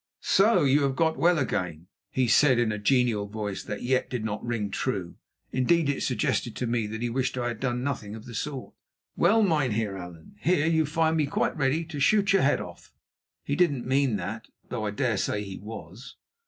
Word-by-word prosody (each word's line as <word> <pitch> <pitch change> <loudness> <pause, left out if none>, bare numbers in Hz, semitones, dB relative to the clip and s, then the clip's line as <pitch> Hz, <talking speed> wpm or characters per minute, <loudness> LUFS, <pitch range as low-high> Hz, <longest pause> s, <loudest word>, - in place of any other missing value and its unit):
"So 215 0 +4
you 140 +1 +4
have 135 -1 +1
got 160 +2 +2
well 175 +1 +4
again," 90 - -2 0.2
he 130 -1 +1
said 130 +1 +5
in 120 -2 +2
a 105 - -3
genial 115 -2 +2
voice 105 -1 -4
that 105 -2 -6
yet 130 +1 +1
did 120 -4 -3
not 105 -1 -3
ring 115 -4 -2
true. 95 -9 -3 0.3
Indeed, 145 +4 +2
it 140 - -1
suggested 120 -1 -1
to 125 - -2
me 115 -2 0
that 110 +2 -5
he 120 - 0
wished 130 +1 -1
I 120 -1 -1
had 120 -2 -5
done 125 -2 -1
nothing 110 -7 -3
of 110 - -10
the 120 - -9
sort. 135 +2 -5 0.4
"Well, 220 +6 +4
Mynheer 125 - +1
Allan, 90 0 -11
here 155 - +2
you 160 -2 +2
find 160 +1 +1
me 150 -2 +1
quite - - 0
ready 150 +3 0
to 155 -3 -7
shoot 200 +7 +3
your 195 - +4
head 145 - +3
off." 85 -1 -10 0.5
(He 145 - -1
didn't 145 -7 +1
mean 130 -2 +2
that, 100 +4 -5 0.2
though 110 -3 -3
I - - 0
dare 110 +1 0
say 105 +2 -1
he 95 -2 -7
was.) 110 +3 -10
125 Hz, 210 wpm, -27 LUFS, 105-145 Hz, 0.5 s, said